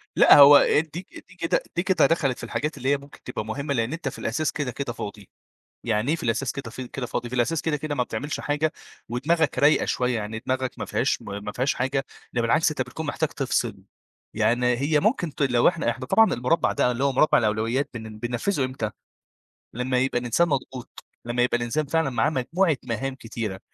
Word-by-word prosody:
لأ، - - +8
هو 145 0 +10 0.3
دي 170 - -4 0.3
دي 185 - -18
كده 165 - 0
دي 175 - +1
كده 180 -5 +3
دخلت 140 -4 +1
في - - -10
الحاجات 150 +2 -3
اللي 130 - -2
هي 140 - +3
ممكن 140 +1 -16
تبقى 125 -4 -5
مهمة، 140 +6 -3
لأن 115 +1 -1
أنت 165 -4 -3
في - - -10
الأساس 150 +7 -1
كده، 145 -4 -3
كده 130 -2 -4
فاضي، 100 -3 -8 0.5
يعني 110 +2 0
إيه - - +2
في 165 - -8
الأساس 120 +2 0
كده 130 -5 -7
في 125 +2 -7
كده 130 +1 -5
فاضي، 120 0 -4
في 125 - -5
الأساس 135 +6 +1
كده، 155 -2 -1
كده 145 0 -4
ما 125 - +1
بتعملش 130 +6 -4
حاجة، 150 +2 0 0.4
ودماغك 150 +6 +1
رايقة 145 +2 +4
شوية، 125 -1 0
يعني 110 0 -4
دماغك 130 -1 -2
ما - - -3
فيهاش - - 0
ما 100 0 -6
ما 105 +1 -6
فيهاش 130 +5 0
حاجة، 135 +2 -1 0.3
ده 120 - +1
بالعكس، 115 +9 +3
أنت 155 - -3
بتكون 160 - -5
محتاج 145 +1 -1
تفصل، 120 -5 -1 0.6
يعني 125 +1 +2
هي 145 +3 +2
ممكن 180 - 0
تل 140 -3 0
لو 120 -1 +4
إحنا 170 -8 +1
إحنا 130 +2 -4
طبعًا 225 +11 +4
المربع 125 +8 +1
ده، 125 - +2
اللي 125 +2 -2
هو 140 - +3
مربع 145 +4 +4
الأولويات، 115 +5 0
بن 110 -2 -8
بننفذه 125 - -1
إمتى؟ 130 -5 -4 0.8
لمّا 125 +2 0
يبقى 130 -1 +1
الإنسان 125 +8 +1
مضغوط، 130 -3 -4 0.2
لمّا 120 +1 0
يبقى 125 0 +2
الإنسان 120 +6 -1
فعلًا 160 0 +1
معاه 130 +4 +1
مجموعة 160 +4 +1
مهام 130 +2 -3
كتيرة، 115 -6 -5
130 Hz, 210 wpm, -25 LUFS, 120-150 Hz, 0.8 s, هو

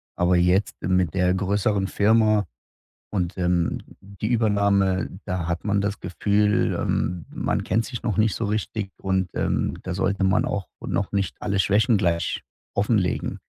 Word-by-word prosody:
Aber 90 0 +3
jetzt 90 +3 +2
mit 90 -2 +1
der 90 -1 +3
größeren 100 +1 0
Firma 110 0 +3 0.6
und, 90 -3 -2
ähm, 90 -1 +1 0.2
die 100 +2 -6
Übernahme, 100 -4 +2 0.2
da 90 -2 -2
hat 85 0 -2
man 100 -1 +2
das 100 0 -2
Gefühl, 105 +3 +1
ähm, 90 -3 -1
man - - -1
kennt 115 +1 0
sich 120 -2 -6
noch 110 -3 -1
nicht 110 -3 +2
so 115 - -2
richtig 105 -1 -2
und, 95 -2 -1
ähm, - - 0
da 90 - -3
sollte 100 +1 0
man 95 0 +3
auch 100 -4 -3
noch 100 - -2
nicht 100 -2 -1
alle 100 -1 -1
Schwächen 105 +5 +3
gleich 85 -4 0 0.3
offenlegen. 100 -2 0
100 Hz, 155 wpm, -24 LUFS, 90-105 Hz, 0.6 s, Aber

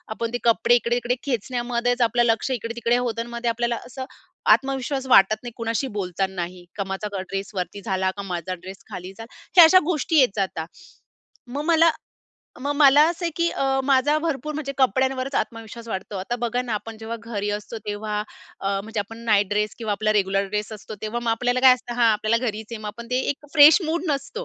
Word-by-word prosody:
आपण 230 +1 -3
ते - - +1
कपडे 235 +1 +4
इकडे-तिकडे 240 +1 0
खेचण्यामध्येच 245 0 -1
आपलं 240 +1 +3
लक्ष 230 +3 +1
इकडे-तिकडे 235 0 0
होतं 235 -2 -2
आणि 235 - -7
मग 235 0 -6
आपल्याला 235 +1 0
असं 260 +1 -7 0.5
आत्मविश्वास 270 0 -3
वाटत 205 -4 +6
नाही, 240 - -6
कुणाशी 230 +3 -1
बोलतानाही 180 -1 -3
का 200 - -2
माझा 195 +2 -4
ड्रेसवरती 195 0 -5
झाला 190 -2 0
का - - -3
माझा 180 -2 -4
ड्रेस 185 +2 -10
खाली 180 +1 -7
झाला, 225 +1 -11 0.2
हे 345 - +12
अशा 370 +3 +7
गोष्टी 320 -1 +1
येत 260 - +5
जाता. 190 -5 -2 0.8
मग 280 +4 -4
मला 330 0 +5 0.7
मग 285 +2 -1
मला 285 0 +7
असं 345 +1 -4
आहे 335 - 0
की 340 0 +2
अ, 270 0 0
माझा 275 +2 +3
भरपूर 305 -1 -3
म्हणजे 290 -2 -4
कपड्यांवरच 260 +2 +1
आत्मविश्वास 230 0 -4
वाटतो. 195 0 -5
आता 195 +6 -3
बघा 240 +1 0
ना 240 -3 -3
आपण 225 +1 -6
जेव्हा 225 +1 -5
घरी 210 -3 -3
असतो 210 +2 -5
तेव्हा 210 0 -3 0.4
अ, 195 - -1
म्हणजे 220 0 -3
आपण 225 +3 -8
नाईट 205 -3 +3
ड्रेस 210 0 0
किंवा 220 -3 -2
आपला 215 +1 +1
रेग्युलर 195 -1 +1
ड्रेस 210 +2 -3
असतो 215 0 -8
तेव्हा 220 +2 -3
मग 230 - +1
आपल्याला 245 +2 0
काय 260 -1 +8
असतं 245 -1 -8
हां, 235 -1 +4
आपल्याला 215 +4 0
घरीच 220 -1 -4
आहे. 230 - -4
मग - - -6
आपण 235 +3 -9
ते 250 - +1
एक 285 +1 -6
फ्रेश 300 +4 +8
मूड 330 +2 -1
नसतो. 295 - -3
235 Hz, 195 wpm, -23 LUFS, 210-260 Hz, 0.8 s, हे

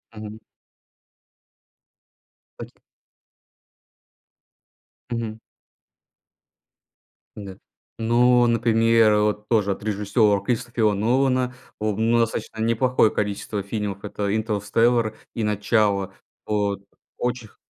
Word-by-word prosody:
Мгм. 105 0 -8 2.2
Точно. - - -10 2.3
Мгм. 115 -2 -4 2.0
Да. 100 -3 -9 0.4
Ну, 120 +2 +3
например, 115 -1 +3
вот 105 0 -1
тоже 105 -4 +2
от 100 - -5
режиссера 105 0 +1
Кристофера 120 -1 0
Нолана, 125 +4 +1 0.3
о 105 0 0
в 105 - -6
ну, 115 +1 +3
достаточно 115 -1 -2
неплохое 115 0 +2
количество 105 0 -3
фильмов- 100 -1 -4
это 100 0 -3
"Интерстеллар" 110 +1 +1 0.2
и 115 - -2
"Начало". 105 -2 +1 0.3
Вот 100 -2 -1 0.4
очень 125 -2 -3
х - - -27
110 Hz, 90 wpm, -23 LUFS, 105-115 Hz, 2.3 s, Ну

